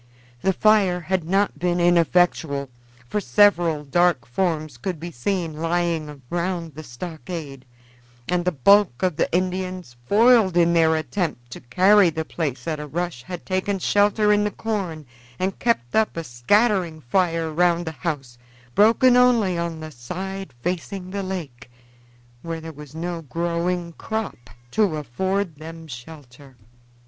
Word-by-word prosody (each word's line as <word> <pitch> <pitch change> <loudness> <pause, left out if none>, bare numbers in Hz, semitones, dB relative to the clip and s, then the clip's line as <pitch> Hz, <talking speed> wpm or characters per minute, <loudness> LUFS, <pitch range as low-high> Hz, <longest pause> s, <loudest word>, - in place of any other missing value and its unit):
The 190 - +2
fire 195 -2 +3
had 180 0 -1
not 195 +4 +1
been 175 0 0
ineffectual, 170 -5 +2 0.4
for 210 - -1
several 170 0 +3
dark 170 -3 +2
forms 155 0 -2
could 175 +6 -4
be 170 +2 -6
seen 165 +4 -2
lying 165 -4 -2
round 170 -2 -2
the 155 - -8
stockade, 155 0 -7 0.6
and 180 0 0
the 180 - +1
bulk 180 0 +4
of 180 -4 +1
the - - 0
Indians, 185 -5 -2
foiled 220 -4 +5
in 170 0 +4
their 160 -1 +4
attempt 155 -5 -3
to - - -7
carry 185 +9 +5
the 160 0 -4
place 155 -3 -4
at 155 -2 -2
a 150 - -6
rush, 170 -3 -3
had 180 +5 -8
taken 190 +1 -1
shelter 205 +2 +3
in 205 0 +2
the 210 - +1
corn 195 -9 -4 0.3
and 185 +1 -2
kept 230 - 0
up 220 -5 +2
a 165 - -2
scattering 170 - +1
fire 165 +3 0
round 175 +1 +2
the 160 - -3
house, 140 -7 -5 0.3
broken 230 - +5
only 240 -7 +4
on 170 -2 -3
the 155 0 -7
side 185 +8 -6
facing 180 +1 -4
the 200 +1 -3
lake, 160 -12 -6 0.7
where 165 -1 -5
there 160 0 -8
was 150 0 -12
no 170 +1 -4
growing 170 +3 -2
crop 215 - -5 0.2
to 200 -3 +2
afford 180 - -2
them 165 +1 -9
shelter. 135 -1 -12
170 Hz, 150 wpm, -23 LUFS, 155-190 Hz, 0.7 s, foiled